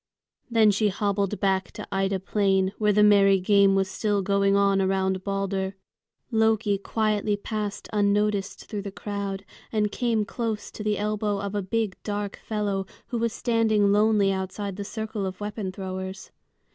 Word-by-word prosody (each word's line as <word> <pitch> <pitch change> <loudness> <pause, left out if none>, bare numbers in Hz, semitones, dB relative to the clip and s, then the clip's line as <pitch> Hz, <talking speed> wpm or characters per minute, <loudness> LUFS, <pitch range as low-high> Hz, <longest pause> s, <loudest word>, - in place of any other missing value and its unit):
Then 225 -3 +5
she 210 +2 +2
hobbled 200 0 -1
back 190 -2 +1
to - - -7
Ida 195 0 0
Plain, 195 -1 +1
where 210 -1 +3
the 210 +1 +4
merry 200 -2 +6
game 200 +1 +4
was 195 0 +2
still 205 +1 -1
going 200 0 +2
on 200 -1 +3
around 190 0 0
Balder. 195 -1 -2 0.6
Loki 220 -2 +2
quietly 210 0 0
passed 210 -1 -4
unnoticed 205 -1 +1
through 205 -2 -4
the 200 0 -6
crowd, 200 -1 -4 0.3
and 210 -2 +1
came 230 -3 0
close 225 -1 -3
to 210 - -7
the 210 -1 0
elbow 210 -1 -1
of 200 0 -4
a 205 - 0
big 210 0 -2
dark 205 -1 -3
fellow 200 -3 -2 0.2
who 240 - -2
was 230 0 0
standing 220 -4 +2
lonely 210 -1 +4
outside 190 +1 -3
the 200 - -5
circle 220 0 -4
of 185 -1 -4
weapon 205 -2 -4
throwers. 190 0 -6
200 Hz, 160 wpm, -26 LUFS, 195-210 Hz, 0.6 s, merry